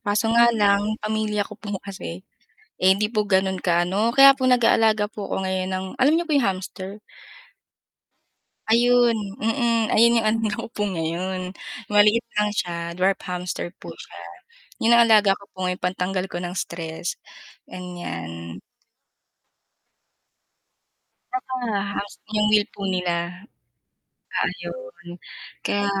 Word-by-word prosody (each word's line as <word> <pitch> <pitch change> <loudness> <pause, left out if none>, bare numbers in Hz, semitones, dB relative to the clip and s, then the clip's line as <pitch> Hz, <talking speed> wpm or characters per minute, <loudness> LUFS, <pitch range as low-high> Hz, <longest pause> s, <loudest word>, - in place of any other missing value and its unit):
kaso 205 +2 0
nga 235 0 +6
lang 200 -2 +3 0.2
pamilya 215 -1 0
ko 210 - -12
po 205 -2 -4
kasi, 190 -2 -7 0.6
eh, 185 - +4
hindi 210 +2 0
po 215 -2 +1
ganon 190 -1 +1
ka-ano, 180 +5 +1
kaya 275 0 +10
po 260 -1 0
nag-aalaga 225 -3 +4
po 205 -2 -6
ako 190 - -2
ngayon 185 0 -1
ng 185 0 -3 0.2
alam 285 +4 +5
niyo 345 - -1
kung 305 -3 +2
yung 230 - +2
hamster? 185 0 -6 1.8
Ayun, 240 +1 +4 0.2
mm, 230 -1 +1
ayun 235 +1 +5
yung 220 - -2
ano 225 +1 0
ko - - -4
po 210 - -5
ngayon, 185 +1 -3 0.3
maliit 210 +2 +4
lang 210 0 +2
siya 170 -3 -3
dwarf 185 +3 +1
hamster 180 -1 -4
po - - -10
siya. - - -12 0.6
Yun 230 - +4
ang 235 - +7
alaga 210 -3 +6
ko - - -14
po - - -47
ngayon 180 0 -2
pantanggal 185 +1 -1
ko 175 - -5
ng 180 +1 -5
stress, 165 0 -4 0.5
ganyan. 85 - -7 2.7
Tsaka 255 0 -4 0.4
halos 200 0 -5 0.2
yung 210 0 +3
wheel 210 0 +4
po - - -9
nila. 180 +1 -2 0.9
Ayun - - -5 0.5
kaya 205 0 0
200 Hz, 135 wpm, -23 LUFS, 180-225 Hz, 2.7 s, kaya